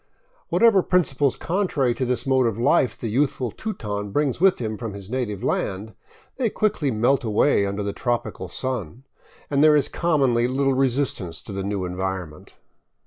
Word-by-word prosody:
Whatever 225 -5 +5
principles 145 -8 +1
contrary 165 -9 0
to 130 - -2
this 125 0 -2
mode 130 -2 +3
of 110 -2 -2
life 125 +1 +2
the 115 - -4
youthful 125 0 0
Teuton 105 - -5
brings 145 +4 0
with 190 -1 +5
him 110 -3 -3
from 110 -1 -6
his 100 +1 -10
native 120 -6 -3
land, 105 +3 -2 0.4
they 250 -4 +1
quickly 210 -9 0
melt 125 +4 +2
away 110 -1 +2
under 100 +1 -3
the 100 0 -3
tropical 115 -6 -3
sun, 125 - -4 0.5
and 140 0 +3
there 155 -1 +7
is 145 -2 +2
commonly 135 -8 +2
little 135 +1 +1
resistance 130 -9 -1
to - - -9
the 95 0 -4
new 100 -1 -2
en 90 0 -5
vironment. 95 -4 -5
125 Hz, 170 wpm, -23 LUFS, 105-140 Hz, 0.5 s, there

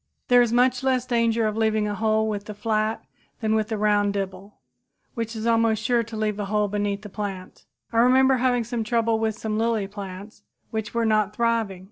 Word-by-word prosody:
There 245 0 +7
is 240 -2 +2
much 250 +1 +3
less 260 -2 +1
danger 230 -2 +1
of 215 -1 -1
leaving 220 -1 +1
a 205 - -2
hole 220 +1 +1
with 205 -1 -3
the 210 - -8
flat 215 +1 -1 0.3
than 220 -1 0
with 215 -1 +1
the 220 - -3
round 205 -1 +2
dibble, 195 0 -5 0.6
which 230 -2 -4
is 220 0 -4
almost 225 -2 +2
sure 240 0 +2
to 225 -1 -7
leave 215 -1 -1
a 205 - -2
hole 210 +1 +1
beneath 205 0 -2
the - - -7
plant. 195 -2 -6 0.3
I - - -1
remember 260 +2 +5
having 245 -1 +1 0.2
trouble 230 0 +1
with 220 -1 -1
some 215 0 -2
lily 225 -3 +1
plants 200 +1 -9 0.3
which 220 0 -4
were 230 -1 +1
not 215 -2 +1
thriving. 230 -5 0
220 Hz, 200 wpm, -24 LUFS, 210-230 Hz, 0.6 s, There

